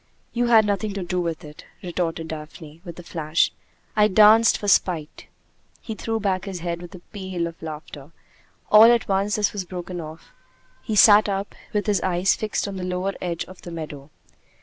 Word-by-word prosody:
"You 240 0 0
had 225 -2 +6
nothing 205 0 -1
to 195 - -3
do 180 +1 -2
with 165 -2 -4
it," 150 0 -12 0.2
retorted 165 -2 -3
Daphne, 155 0 -9
with 170 -3 -9
a 175 - -9
flash. 160 -1 0 0.4
"I 210 -1 +5
danced 215 +2 +6
for 205 - -6
spite." 170 -6 0 0.5
He 220 - -6
threw 225 +1 -3
back 195 -3 -1
his 190 -4 -6
head 170 0 -4
with 175 +1 -10
a 175 - -12
peal 190 -4 -4
of 165 0 -8
laughter. 150 -2 -9 0.6
All 220 +2 +9
at 240 0 +1
once 200 +1 0
this 210 -2 0
was 200 -2 -3
broken 180 -1 -6
off. 155 +1 -11 0.5
He 220 - -3
sat 210 0 +7
up, 195 +1 -3 0.2
with 210 -2 -1
his 205 -2 +1
eyes 185 +1 +1
fixed 215 -1 -2
on 195 -1 -6
the 185 - -5
lower 180 +2 -2
edge 170 -2 -3
of 185 -1 -14
the - - -9
meadow. 150 -4 -8
185 Hz, 195 wpm, -23 LUFS, 170-210 Hz, 0.6 s, All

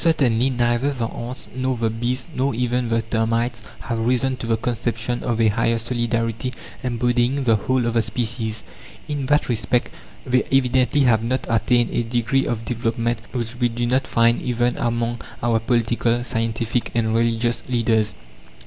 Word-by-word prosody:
Certainly, 135 -7 +3
neither 120 +2 +1
the 120 -4 -2
ants, 120 +2 -6
nor 130 -1 -1
the 115 -1 0
bees, 120 +2 -2
nor 130 -1 0
even 125 0 0
the 115 0 +1
termites, 115 +1 0 0.2
have 115 +1 -3
risen 125 +3 +1
to 115 - -6
the 115 -1 +2
conception 120 0 -2
of 115 -1 -1
a 110 -1 +5
higher 115 +2 +1
solidarity 115 +1 -1 0.3
embodying 125 +2 +1
the 115 -3 +4
whole 125 +4 0
of 120 - 0
the 115 - +3
species. 110 0 -3 0.4
In 145 -3 -3
that 150 +1 +3
respect 120 +1 0 0.4
they 125 0 +3
evidently 130 +1 +3
have 115 -4 +4
not 130 +3 -1
attained 120 +1 +2
a - - +1
degree 120 +3 0
of 115 -1 -2
development 115 0 -1
which 120 -1 -4
we 120 -1 +3
do 120 +1 -2
not 130 +3 +1
find 115 0 +3
even 120 0 0
among 120 -3 -1 0.2
our 115 -1 +3
political, 120 0 +1
scientific, 115 0 -1
and 110 -1 +1
religious 115 +1 +1
leaders. 110 -3 +1
120 Hz, 165 wpm, -22 LUFS, 115-125 Hz, 0.4 s, a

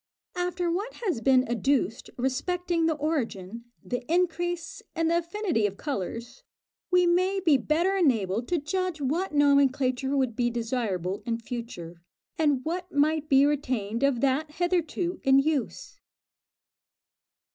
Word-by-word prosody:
After 355 -1 -1
what 410 +8 -3
has 340 - 0
been 260 0 +4
adduced 245 0 0
respecting 335 +6 0
the 320 - +1
origin, 235 - -3 0.2
the 245 0 -3
increase, 350 -1 -1
and 330 0 +1
the 340 - +3
affinity 340 - -1
of 200 -1 -8
colours, 240 - -5 0.5
we 360 -1 +4
may 370 +3 +2
be 330 -6 +4
better 340 +8 +1
enabled 235 - +1
to 350 - +1
judge 350 +2 -2
what 315 +8 -1
nomenclature 280 -2 +2
would 255 -4 0
be 240 0 +1
desirable 225 -6 -2
in 230 -1 0
future, 225 -8 -7 0.3
and 290 -5 +1
what 355 +2 -3
might 300 +1 +1
be 270 0 +6
retained 250 -7 -1
of 275 -4 +2
that 280 +3 0
hitherto 350 +1 -1
in 270 0 +5
use. 280 -1 -1
285 Hz, 135 wpm, -27 LUFS, 245-345 Hz, 0.5 s, be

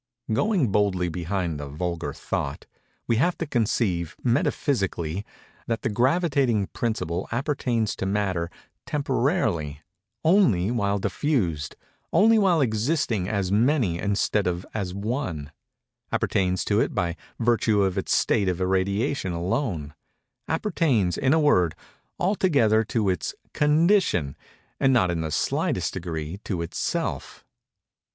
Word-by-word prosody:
Going 175 - +2
boldly 95 -4 +1
behind 85 -2 -2
the 75 - -5
vulgar 85 +3 -3
thought, 70 - -4 0.4
we 115 - +1
have 170 +8 +2
to 165 - -2
conceive, 105 - 0
metaphysically, 100 - 0 0.4
that 115 -1 -2
the 130 - +1
gravitating 130 - +2
principle 95 -6 -2
appertains 120 -4 0
to 95 - -2
Matter 95 -4 -1 0.4
temporarily—only 110 - 0
while 100 -4 +1
diffused—only 135 - 0
while 180 -6 +3
existing 110 - 0
as 100 -3 -1
Many 110 - +2
instead 100 0 +1
of 90 +1 -2
as 100 -4 -2
One—appertains 95 - -3
to 105 +1 +2
it - - 0
by 85 -1 0 0.2
virtue 115 -3 +2
of 95 -1 0
its 95 - -2
state 100 -5 +2
of 90 -1 -2
irradiation 95 +4 0
alone—appertains, 105 - -2
in 130 - +1
a 160 - +4
word, 90 - +3 0.4
altogether 145 - +3
to 110 -1 0
its 90 -3 -1 0.2
condition, 150 - +3 0.4
and 135 - +4
not 95 -8 +3
in 85 -1 -2
the 80 - -2
slightest - - 0
degree 85 0 -5
to 90 -5 -2
itself. 85 - -3
105 Hz, 115 wpm, -25 LUFS, 90-130 Hz, 0.4 s, a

